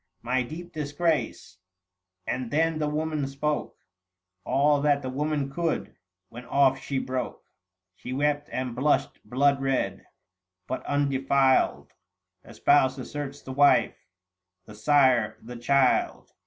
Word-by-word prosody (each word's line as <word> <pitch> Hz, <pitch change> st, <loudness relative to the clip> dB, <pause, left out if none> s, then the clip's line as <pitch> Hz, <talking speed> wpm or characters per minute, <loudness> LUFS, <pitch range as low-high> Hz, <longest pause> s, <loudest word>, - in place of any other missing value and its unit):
My 125 Hz, +2 st, +1 dB
deep 170 Hz, +7 st, -8 dB
disgrace 145 Hz, -, -2 dB, 0.3 s
;" 90 Hz, 0 st, -57 dB
and 125 Hz, -1 st, -3 dB
then 160 Hz, +2 st, +1 dB
the 150 Hz, -, 0 dB
woman 150 Hz, -1 st, -2 dB
spoke 145 Hz, +2 st, -3 dB, 0.7 s
All 145 Hz, +1 st, +2 dB
that 145 Hz, -1 st, +2 dB
the 130 Hz, -, -4 dB
woman 145 Hz, 0 st, -2 dB
could; 165 Hz, +2 st, -2 dB, 0.3 s
when 120 Hz, +2 st, -10 dB
off 135 Hz, 0 st, +3 dB
she 140 Hz, -, -4 dB
broke, 130 Hz, -1 st, -3 dB, 0.6 s
880 -, -, -28 dB
She 125 Hz, -, -5 dB
wept 145 Hz, +1 st, 0 dB
and 125 Hz, -2 st, -3 dB
blushed 145 Hz, +4 st, +1 dB
bloodred. 135 Hz, 0 st, +1 dB, 0.6 s
But 130 Hz, -, -4 dB
undefiled 135 Hz, -, +1 dB, 0.5 s
The 115 Hz, -, -15 dB
spouse 130 Hz, +2 st, +3 dB
asserts 140 Hz, +2 st, -6 dB
the 130 Hz, -, -7 dB
wife; 145 Hz, +1 st, +3 dB, 0.6 s
the 105 Hz, -, -12 dB
sire 130 Hz, 0 st, +3 dB
the 120 Hz, +2 st, -10 dB
child. 130 Hz, +2 st, +1 dB
135 Hz, 130 wpm, -26 LUFS, 130-145 Hz, 0.7 s, off